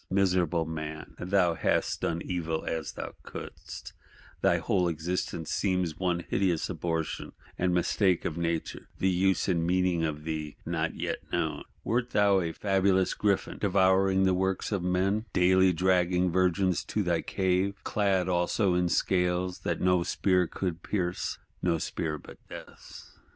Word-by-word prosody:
Miserable 90 -4 +2
man! 80 -1 -6
thou 90 -2 +2
"hast - - 0
done 85 0 -1
evil 80 -3 -2
as 80 -2 -3
thou - - -6
couldst:" - - -9 0.5
thy - - +4
whole 90 -3 +1
existence 85 0 -3
seems 90 -5 0
one 90 -2 0
hideous 90 -3 0
abortion 80 -2 -3 0.2
and 90 0 +1
mistake 90 +1 +2
of 80 - -2
Nature; 85 -1 -3
the 95 - +2
use 95 0 +2
and 85 -4 +1
meaning 90 -1 +1
of 75 -1 -2
thee 75 -2 -4
not - - -1
yet - - -3
known. - - -1 0.2
Wert 120 +1 0
thou 100 -3 +4
a 85 -2 -2
fabulous 95 0 +2
Griffin, 100 -2 0
devouring 95 -1 +3
the 95 -1 +3
works 95 +2 -1
of 100 -3 0
men; 95 +4 +1
daily 95 +1 +5
dragging 90 0 +2
virgins 90 -1 +2
to - - -1
thy - - +1
cave;—clad 95 0 0
also 90 +2 +1
in 90 0 +1
scales 90 0 +1
that - - -2
no 90 -1 +3
spear 90 0 +1
would 90 -3 -1
pierce: 90 -3 -2 0.2
no 85 -2 +2
spear 80 -1 -3
but - - -13
Death's? - - -12
90 Hz, 145 wpm, -29 LUFS, 85-95 Hz, 0.5 s, daily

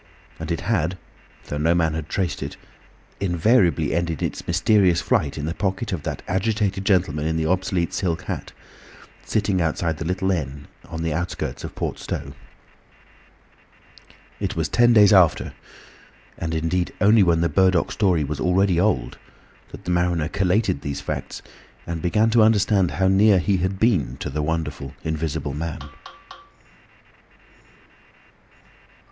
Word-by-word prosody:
And 80 +1 -5
it 85 - -2
had, 90 -3 0 0.5
though 75 - -4
no 80 +3 +2
man 80 -2 +1
had 80 -1 -5
traced 95 -3 -2
it, - - -6 0.6
invariably 90 - +2
ended 85 -2 -1
its - - -4
mysterious 90 0 +3
flight 75 -3 0
in 75 - -3
the 80 - -2
pocket 100 +3 -2
of 85 - -3
that - - -5
agitated 100 0 -1
gentleman 85 -6 +1
in 80 0 -1
the 80 - 0
obsolete 90 0 0
silk 90 -2 -1
hat, - - -5 0.7
sitting 100 -4 0
outside 80 0 -1
the - - -3
little 90 +2 0
inn 70 -5 -4 0.2
on 80 0 -5
the 80 -2 -1
outskirts 85 +3 -4
of - - -7
Port - - -3
Stowe. - - -5 2.1
It - - -3
was - - -1
ten 120 0 +4
days 105 -3 +6
after—and 85 -2 -1
indeed 85 +3 -1
only 105 +2 +5
when 85 -3 +3
the 85 - +3
Burdock 95 -1 +2
story 90 -7 +2
was 75 0 -4
already 90 +2 +2
old—that 105 +4 -4
the 90 - -2
mariner 85 -3 +1
collated 95 -5 +1
these 70 -1 -4
facts - - -5 0.4
and 85 -1 -4
began 110 +6 +2
to 115 0 +5
understand 105 -4 +3
how 95 +5 0
near 100 +1 +5
he 95 +2 +1
had 95 +2 -1
been 95 - +1
to - - -5
the 75 +2 -2
wonderful 75 -3 -3
Invisible 80 -3 -3
Man. 80 +1 -4
90 Hz, 145 wpm, -23 LUFS, 80-95 Hz, 2.1 s, days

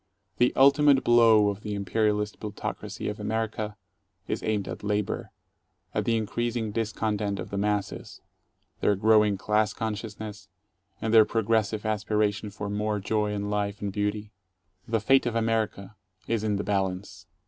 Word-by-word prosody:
The 125 +1 +4
ultimate 140 0 +5
blow 115 -3 +6
of 100 0 -5
the 105 -1 -4
imperialist 105 +1 0
plutocracy 105 -1 -5
of - - -4
America 110 -1 -2 0.5
is - - -2
aimed 105 -3 -1
at 90 - -6
Labor, 105 -1 -1 0.6
at 105 - -1
the 115 -1 +2
increasing 115 +1 -2
discontent 105 -2 -1
of - - -6
the 100 - -3
masses, 105 0 -2 0.6
their 105 - +2
growing 105 0 +4
class 105 +1 +1
consciousness, 105 -2 -5 0.5
and 110 0 0
their 110 -1 +9
progressive 110 0 0
aspiration 105 -1 0
for 105 0 -6
more 105 +1 -1
joy 105 +1 0
and 105 0 -3
life 105 0 -1
and 100 -1 -4
beauty. 105 +1 -2 0.6
The 115 0 +1
fate 135 +3 +4
of 120 - -2
America 110 -3 -1 0.3
is 115 -2 0
in 105 -1 +1
the 100 - -2
balance. 95 -1 -2
105 Hz, 150 wpm, -27 LUFS, 105-110 Hz, 0.6 s, their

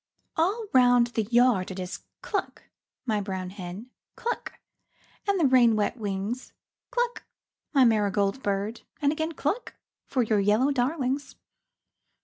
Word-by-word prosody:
All 400 +8 +1
round 245 -2 +6
the 225 - +1
yard 235 -4 +3
it 190 - -6
is 180 -1 -5 0.2
cluck, - - -3 0.4
my 215 -4 0
brown 190 -2 -4
hen, 195 +5 -8 0.2
Cluck, 475 0 -3 0.7
and 400 -2 +2
the 325 - +4
rain 250 -4 +5
wet 210 +1 0
wings, 210 +2 -4 0.4
Cluck, 485 -1 -1 0.5
my 275 -4 +5
marigold 205 0 +2
bird, 205 +2 -2 0.2
and 285 -2 +3
again 315 +2 -2
Cluck 315 - -2 0.3
for 255 -2 +1
your 215 -2 +2
yellow 210 +8 +3
darlings. 270 +1 -1
245 Hz, 130 wpm, -27 LUFS, 205-280 Hz, 0.7 s, round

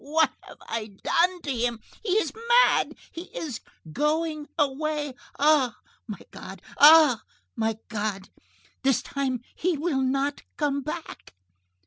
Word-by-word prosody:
What 310 -1 +2
have - - -13
I 225 -2 -4 0.2
done 355 +1 +2
to 280 -3 -2
him? 235 -1 -1 0.2
He 405 -5 -1
is 435 - +1 0.3
mad! - - +1 0.2
He 335 +2 -7
is 290 - -4 0.3
going 305 - 0
away! 295 0 -1 0.2
Ah! 285 -5 +3 0.3
my 210 -3 -5
God! 190 0 -10 0.2
Ah! 300 -5 +8 0.3
my 225 -1 -1
God! 205 -3 -3 0.5
This 270 -3 +2
time 265 -4 -2
he 350 -2 -1
will 290 -3 0
not 275 +2 0 0.2
come 285 -2 0
back!" 305 - -7
285 Hz, 130 wpm, -26 LUFS, 245-310 Hz, 0.5 s, Ah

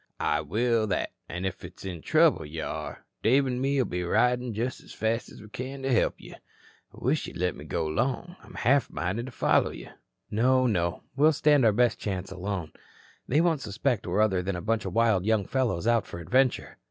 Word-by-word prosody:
"I - - +1
will 115 -1 +1
that. 100 - -1 0.2
An' 90 +2 -4
if 95 - -4
it's 90 +2 -10
in 90 -4 -5
trouble 160 - +3
you 80 +1 -6
are, - - -6 0.2
Dave 135 +4 +4
an' 125 -1 -2
me'll 135 -1 +2
be 90 0 -3
ridin' 125 +6 +2
just 120 +4 -2
as - - -13
fast 115 +1 -1
as - - -12
we - - -12
can 130 +5 -6
to 135 -1 +1
help 115 - +1
you. - - -11 0.6
Wish 145 +5 -1
you'd - - -8
let 90 -1 0
me 75 - -10
go 80 +2 -2
'long. 130 - -2
I'm - - -14
half 140 +3 +2
minded 95 +8 -3
to - - -7
follow - - +2
you." - - -9 0.4
"No, 130 +4 +3
no. 90 -7 0
We'll 150 +3 +5
stand 145 -3 +4
our 110 - +6
best 120 +2 +2
chance 95 -3 -4
alone. 95 -3 -4 0.6
They 145 +5 +3
won't 165 -4 +1
suspect 110 0 -1
we're 90 +4 +1
other 95 -4 +2
than 95 +1 -2
a - - -3
bunch 115 0 0
of - - -4
wild 115 -5 +3
young 110 -1 +1
fellows 125 -9 -1
out 115 -3 +2
for - - -7
adventure." 130 +9 +1
115 Hz, 210 wpm, -27 LUFS, 95-130 Hz, 0.6 s, our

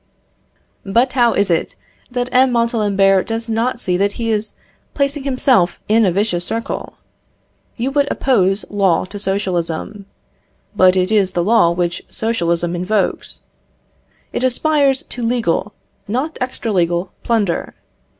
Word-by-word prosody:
But 235 +6 +1
how 240 -3 +3
is 200 -2 +2
it 165 - -1 0.3
that 245 0 -2
M. 255 0 +4
Montalembert 205 -5 +2
does 225 +1 -3
not 230 +2 -1
see 180 -6 0
that 200 +1 +1
he 230 -1 -2
is 215 0 -2 0.4
placing 280 0 -1
himself 255 -9 +2
in 220 0 +4
a - - +2
vicious 180 -2 0
circle? 230 +5 -4 0.8
You 250 +3 -1
would 285 0 +1
oppose 195 -6 +1
law 195 -5 +2
to 205 +2 -9
socialism. 195 0 -3 0.7
But 185 0 +5
it 185 +2 +1
is 200 -4 +2
the 175 - 0
law 210 -3 +4
which 175 0 -1
socialism 175 -6 -1
invokes. 190 +4 -2 0.9
It - - -2
aspires 275 +1 +2
to 245 - -8
legal, 230 -5 0 0.4
not 260 +9 -2
extra 250 -3 -3
legal 175 0 0
plunder. 210 -7 -1
210 Hz, 135 wpm, -18 LUFS, 185-245 Hz, 0.9 s, But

